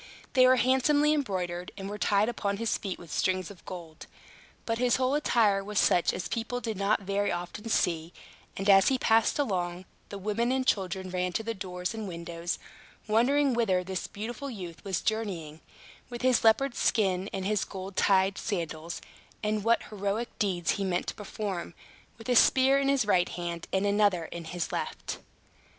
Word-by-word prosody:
They 255 Hz, -1 st, +6 dB
were 255 Hz, -, +6 dB
handsomely 265 Hz, +4 st, +3 dB
embroidered, 180 Hz, -, -2 dB
and 195 Hz, -1 st, -5 dB
were 205 Hz, +1 st, -6 dB
tied 205 Hz, +1 st, +3 dB
upon 200 Hz, -4 st, -2 dB
his 230 Hz, +1 st, 0 dB
feet 195 Hz, -3 st, -4 dB
with 170 Hz, -3 st, -12 dB
strings 185 Hz, 0 st, 0 dB
of 190 Hz, -, -15 dB
gold. 170 Hz, -3 st, -9 dB, 0.6 s
But 230 Hz, 0 st, -1 dB
his 250 Hz, -1 st, +3 dB
whole 260 Hz, +1 st, +1 dB
attire 220 Hz, -9 st, +2 dB
was 210 Hz, +1 st, -5 dB
such 175 Hz, -, +4 dB
as 175 Hz, -3 st, -4 dB
people 235 Hz, +5 st, -3 dB
did 225 Hz, -3 st, -3 dB
not 200 Hz, +2 st, +1 dB
very 200 Hz, +1 st, 0 dB
often 175 Hz, +6 st, -5 dB
see; 165 Hz, -5 st, +1 dB, 0.5 s
and 195 Hz, -, -3 dB
as 195 Hz, -1 st, +7 dB
he 265 Hz, -, +3 dB
passed 225 Hz, -2 st, +3 dB
along, 180 Hz, -9 st, -1 dB, 0.2 s
the 200 Hz, -, -6 dB
women 215 Hz, +5 st, 0 dB
and 260 Hz, 0 st, 0 dB
children 190 Hz, -4 st, -1 dB
ran 180 Hz, 0 st, -1 dB
to 225 Hz, -, -1 dB
the 230 Hz, +1 st, -2 dB
doors 180 Hz, -2 st, -4 dB
and 220 Hz, -2 st, -5 dB
windows, 170 Hz, -1 st, -4 dB, 0.5 s
wondering 260 Hz, +6 st, +3 dB
whither 195 Hz, -6 st, +2 dB
this 185 Hz, 0 st, -4 dB
beautiful 240 Hz, +7 st, -6 dB
youth 180 Hz, -8 st, -8 dB
was 190 Hz, -4 st, -2 dB
journeying, 180 Hz, -9 st, -3 dB, 0.5 s
with 240 Hz, 0 st, -7 dB
his 255 Hz, -2 st, +3 dB
leopard's 240 Hz, +4 st, +3 dB
skin 190 Hz, -2 st, +1 dB
and 190 Hz, -1 st, -4 dB
his 210 Hz, 0 st, +1 dB
golden 190 Hz, 0 st, -7 dB
tied 190 Hz, 0 st, +3 dB
sandals, 165 Hz, -4 st, -4 dB, 0.4 s
and 210 Hz, -1 st, 0 dB
what 230 Hz, +1 st, +3 dB
heroic 205 Hz, +3 st, -2 dB
deeds 180 Hz, -5 st, +1 dB
he 200 Hz, -, -2 dB
meant 180 Hz, -2 st, 0 dB
to -, -, -4 dB
perform, 195 Hz, -4 st, -5 dB, 0.4 s
with 225 Hz, -, -11 dB
a 250 Hz, -, +2 dB
spear 265 Hz, +3 st, +5 dB
in 275 Hz, 0 st, +1 dB
his 275 Hz, -5 st, +2 dB
right 180 Hz, -4 st, +3 dB
hand 170 Hz, -1 st, -5 dB
and 190 Hz, +1 st, +1 dB
another 200 Hz, -4 st, +2 dB
in 170 Hz, +1 st, -7 dB
his 175 Hz, 0 st, -4 dB
left. -, -, -4 dB
200 Hz, 180 wpm, -29 LUFS, 180-230 Hz, 0.6 s, as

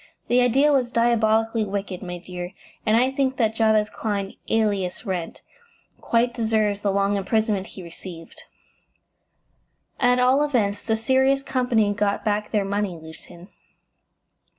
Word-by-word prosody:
The 245 Hz, +1 st, +4 dB
idea 270 Hz, +5 st, +4 dB
was 255 Hz, -3 st, +2 dB
diabolically 225 Hz, -1 st, +2 dB
wicked, 195 Hz, -2 st, -4 dB
my 180 Hz, -2 st, -6 dB
dear, 180 Hz, +1 st, -7 dB, 0.3 s
and 215 Hz, +1 st, +4 dB
I 255 Hz, +2 st, +3 dB
think 265 Hz, -1 st, -1 dB
that 225 Hz, -3 st, +1 dB
Jabez 220 Hz, -1 st, +3 dB
Clyne, 200 Hz, -3 st, -3 dB, 0.2 s
alias 205 Hz, -3 st, 0 dB
Wrent, 180 Hz, -4 st, -4 dB, 0.6 s
quite 235 Hz, +1 st, +1 dB
deserves 220 Hz, -3 st, 0 dB
the 200 Hz, -, +1 dB
long 200 Hz, +1 st, +1 dB
imprisonment 205 Hz, 0 st, 0 dB
he 190 Hz, -, -10 dB
received." 170 Hz, 0 st, -11 dB, 1.6 s
"At 250 Hz, -1 st, +3 dB
all 255 Hz, +3 st, +4 dB
events, 210 Hz, -8 st, 0 dB
the 225 Hz, -, 0 dB
Sirius 265 Hz, +4 st, +2 dB
Company 235 Hz, -6 st, +1 dB
got 205 Hz, +1 st, -1 dB
back 210 Hz, 0 st, 0 dB
their 210 Hz, -3 st, 0 dB
money, 200 Hz, -3 st, -2 dB
Lucian." 165 Hz, +3 st, -13 dB
215 Hz, 135 wpm, -23 LUFS, 195-240 Hz, 1.6 s, The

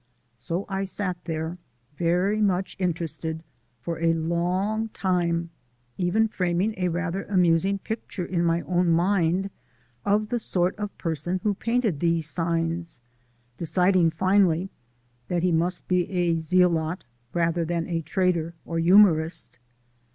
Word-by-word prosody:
So 175 Hz, +8 st, -3 dB
I 195 Hz, 0 st, -2 dB
sat 190 Hz, -1 st, 0 dB
there 160 Hz, +1 st, -3 dB, 0.4 s
very 180 Hz, +7 st, +1 dB
much 190 Hz, -2 st, 0 dB
interested, 160 Hz, -2 st, -3 dB, 0.4 s
for 170 Hz, +3 st, -4 dB
a 165 Hz, 0 st, +3 dB
long 180 Hz, +7 st, -1 dB
time, 170 Hz, -3 st, 0 dB, 0.4 s
even 190 Hz, +5 st, +2 dB
framing 185 Hz, +1 st, 0 dB
a 180 Hz, -1 st, 0 dB
rather 180 Hz, +2 st, -2 dB
amusing 180 Hz, 0 st, +2 dB
picture 200 Hz, -3 st, -5 dB
in 170 Hz, -1 st, -1 dB
my 170 Hz, 0 st, +2 dB
own 175 Hz, 0 st, +1 dB
mind 180 Hz, +2 st, +2 dB, 0.5 s
of 210 Hz, +1 st, +1 dB
the 240 Hz, -, 0 dB
sort 180 Hz, -4 st, 0 dB
of 205 Hz, -1 st, -5 dB
person 170 Hz, +2 st, -2 dB
who 210 Hz, -, +2 dB
painted 230 Hz, -, 0 dB
these 165 Hz, -1 st, +1 dB
signs, 165 Hz, -2 st, -2 dB, 0.6 s
deciding 180 Hz, +1 st, +3 dB
finally 185 Hz, +1 st, +2 dB, 0.6 s
that 175 Hz, -1 st, -1 dB
he 180 Hz, -, +3 dB
must 170 Hz, +2 st, 0 dB
be 180 Hz, -1 st, +1 dB
a 175 Hz, -3 st, +1 dB
zealot 165 Hz, 0 st, +1 dB, 0.3 s
rather 170 Hz, 0 st, +1 dB
than 165 Hz, 0 st, -1 dB
a 170 Hz, -1 st, -2 dB
trader 170 Hz, 0 st, 0 dB
or 165 Hz, -1 st, -2 dB
humourist. 165 Hz, -, +4 dB
175 Hz, 130 wpm, -25 LUFS, 165-190 Hz, 0.6 s, humourist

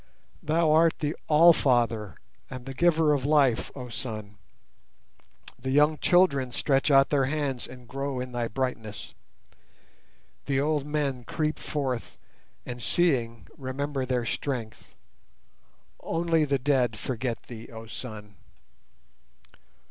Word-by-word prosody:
Thou 160 Hz, +1 st, +2 dB
art 160 Hz, +1 st, +4 dB
the 150 Hz, +1 st, -2 dB
All 165 Hz, +3 st, +7 dB
Father 115 Hz, -, +1 dB, 0.3 s
and 130 Hz, -1 st, -8 dB
the 135 Hz, -, -6 dB
giver 160 Hz, 0 st, +3 dB
of 140 Hz, -3 st, 0 dB
life, 140 Hz, -5 st, +3 dB
oh 125 Hz, -3 st, -7 dB
Sun. 110 Hz, -4 st, -6 dB, 1.2 s
The 130 Hz, +2 st, -4 dB
young 150 Hz, +3 st, +3 dB
children 140 Hz, -8 st, +3 dB
stretch 135 Hz, +3 st, +1 dB
out 135 Hz, -1 st, +5 dB
their 140 Hz, -2 st, +3 dB
hands 140 Hz, -3 st, -2 dB
and 125 Hz, -1 st, -13 dB
grow 135 Hz, 0 st, -3 dB
in 125 Hz, 0 st, -5 dB
thy 120 Hz, -1 st, -2 dB
brightness; 115 Hz, -3 st, -4 dB, 1.3 s
The 135 Hz, -1 st, +1 dB
old 145 Hz, 0 st, 0 dB
men 140 Hz, -4 st, -1 dB
creep 155 Hz, +4 st, -2 dB
forth 135 Hz, -5 st, -3 dB, 0.5 s
and 125 Hz, 0 st, -6 dB
seeing 115 Hz, -, +1 dB
remember 135 Hz, +1 st, -3 dB
their 125 Hz, -2 st, 0 dB
strength. 115 Hz, -2 st, -4 dB, 1.0 s
Only 165 Hz, -1 st, +1 dB
the 140 Hz, -1 st, +1 dB
dead 125 Hz, -4 st, +1 dB
forget 120 Hz, +1 st, -3 dB
Thee, 115 Hz, -2 st, -10 dB
oh 115 Hz, 0 st, -9 dB
Sun! 105 Hz, -3 st, -8 dB
135 Hz, 125 wpm, -27 LUFS, 120-150 Hz, 1.3 s, All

